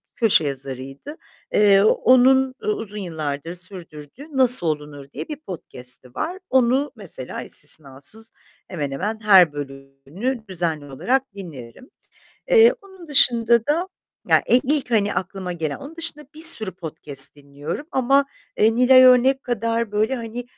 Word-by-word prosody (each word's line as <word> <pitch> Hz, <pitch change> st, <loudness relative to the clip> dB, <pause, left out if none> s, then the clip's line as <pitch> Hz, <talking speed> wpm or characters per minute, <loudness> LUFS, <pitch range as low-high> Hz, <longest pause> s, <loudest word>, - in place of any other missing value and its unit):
köşe 225 Hz, -8 st, +3 dB
yazarıydı. 135 Hz, -, -7 dB, 0.4 s
Eee, 200 Hz, -2 st, +5 dB
onun 260 Hz, +3 st, +4 dB
u -, -, -6 dB
uzun 225 Hz, -, -3 dB
yıllardır 160 Hz, -4 st, -5 dB
sürdürdüğü 180 Hz, -, -10 dB
"Nasıl 250 Hz, -8 st, +4 dB
olunur?" 150 Hz, -2 st, -4 dB
diye -, -, -6 dB
bir 300 Hz, -, -5 dB
podcast'i 125 Hz, -, -9 dB
var. 355 Hz, +4 st, -4 dB
Onu 260 Hz, +3 st, +2 dB
mesela 175 Hz, -, -8 dB
istisnasız, 145 Hz, +9 st, -6 dB, 0.4 s
hemen 150 Hz, -6 st, -4 dB
hemen 210 Hz, +10 st, -4 dB
her 190 Hz, -7 st, +6 dB
bölümünü 140 Hz, -, -6 dB
düzenli 165 Hz, -5 st, -3 dB
olarak 245 Hz, -, -1 dB
dinlerim. 160 Hz, -, -11 dB, 0.6 s
Eee, 470 Hz, 0 st, +7 dB
onun 380 Hz, -4 st, -15 dB
dışında 235 Hz, -4 st, +3 dB
da 335 Hz, +5 st, 0 dB, 0.4 s
ya -, -, +4 dB, 0.2 s
ilk, 280 Hz, -1 st, -1 dB
hani, 210 Hz, -3 st, +1 dB
aklıma 185 Hz, 0 st, -4 dB
gelen. 160 Hz, -4 st, -4 dB
Onun 295 Hz, +4 st, -11 dB
dışında 300 Hz, -2 st, -4 dB
bir 315 Hz, -, -10 dB
sürü 220 Hz, -, +3 dB
podcast 150 Hz, -5 st, +1 dB
dinliyorum 145 Hz, -, -7 dB
ama, 275 Hz, +2 st, +2 dB, 0.3 s
eee, 220 Hz, +1 st, +3 dB
Nilay 255 Hz, +2 st, +6 dB
Örnek 255 Hz, +2 st, +5 dB
kadar 230 Hz, -2 st, -2 dB
böyle 215 Hz, +5 st, 0 dB
hani, 235 Hz, +1 st, -6 dB
210 Hz, 135 wpm, -21 LUFS, -, 0.6 s, Eee